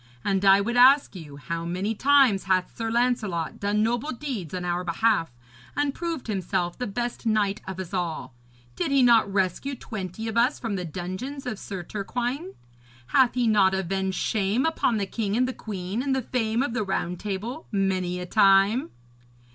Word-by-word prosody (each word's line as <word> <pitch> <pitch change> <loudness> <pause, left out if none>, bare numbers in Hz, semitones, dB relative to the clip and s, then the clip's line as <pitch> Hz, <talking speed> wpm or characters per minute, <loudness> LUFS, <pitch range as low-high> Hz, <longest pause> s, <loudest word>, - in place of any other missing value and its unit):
And 195 -1 +1
I 195 0 +6
would 235 +4 -1
ask 265 -1 +6
you, 150 -5 -9
how 165 +3 -4
many 185 +6 -2
times 265 -5 +4
hath 185 -1 0
Sir 225 -1 -3
Lancelot 225 -9 0
done 205 +1 +1
noble 240 +6 -1
deeds 245 - -5
on 180 -1 -4
our 175 0 -1
behalf 180 0 +1 0.5
and 290 -1 0
proved 335 -4 -4
himself 180 -4 -2
the 250 - -4
best 240 +3 -4
knight 210 -2 +1
of 190 -1 -6
us 190 0 -6
all? 165 -8 -3 0.4
Did - - -1
he 275 -2 +4
not 230 -4 +5
rescue 195 +8 -1
twenty 215 -2 -6
of 225 +1 -3
us 245 +5 +3
from 225 -4 -3
the 180 -2 -3
dungeons 185 - -6
of 230 -5 -4
Sir 190 -3 -6
Turquine? 245 - -4 0.5
Hath 255 -2 +4
he 250 -1 +1
not 200 -4 +4
avenged 190 0 -2
shame 215 +5 0
upon 285 -7 +1
the 200 - -1
king 205 +1 -2
and 255 +1 +2
the 255 - -3
queen, 195 0 -4
and 270 0 0
the 265 - -1
fame 230 0 0
of 245 - -3
the 225 -3 0
Round 180 -2 -2
Table 215 +9 -5
many 185 -3 0
a 180 - -5
time? 195 +5 +4
210 Hz, 185 wpm, -25 LUFS, 185-245 Hz, 0.5 s, I